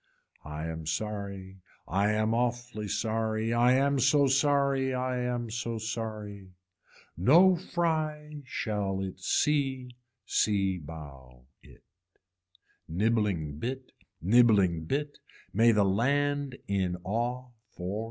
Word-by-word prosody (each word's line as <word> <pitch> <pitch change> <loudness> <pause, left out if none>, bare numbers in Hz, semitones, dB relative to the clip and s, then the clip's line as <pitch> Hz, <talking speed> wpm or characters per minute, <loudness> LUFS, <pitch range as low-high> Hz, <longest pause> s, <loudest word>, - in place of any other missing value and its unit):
I 75 +1 -6
am 80 -1 -6
sorry 100 +1 -4 0.3
I 100 +4 +1
am 110 +1 +1
awfully 120 -2 -2
sorry, 110 +1 -1
I 120 +2 +4
am 140 +1 +2
so 140 +3 +4
sorry, 135 -1 +2
I 125 0 -1
am 120 -2 -2
so 115 0 -3
sorry. 105 -4 -6 0.6
No 170 - +6
fry 155 -4 -2
shall 105 -6 -2
it 95 -1 -6
see 135 +2 0 0.3
c 95 -5 +1
bough 70 -6 -11 0.2
it. - - -18 1.1
Nibbling 95 -6 0
bit, 130 +4 -5 0.3
nibbling 100 -5 +4
bit, 145 - -3 0.3
may 115 +4 +5
the 105 -2 +3
land 140 +6 0
in 95 -3 0
awe 120 +5 -2 0.2
for. 95 +4 -5
115 Hz, 110 wpm, -29 LUFS, 95-130 Hz, 1.1 s, No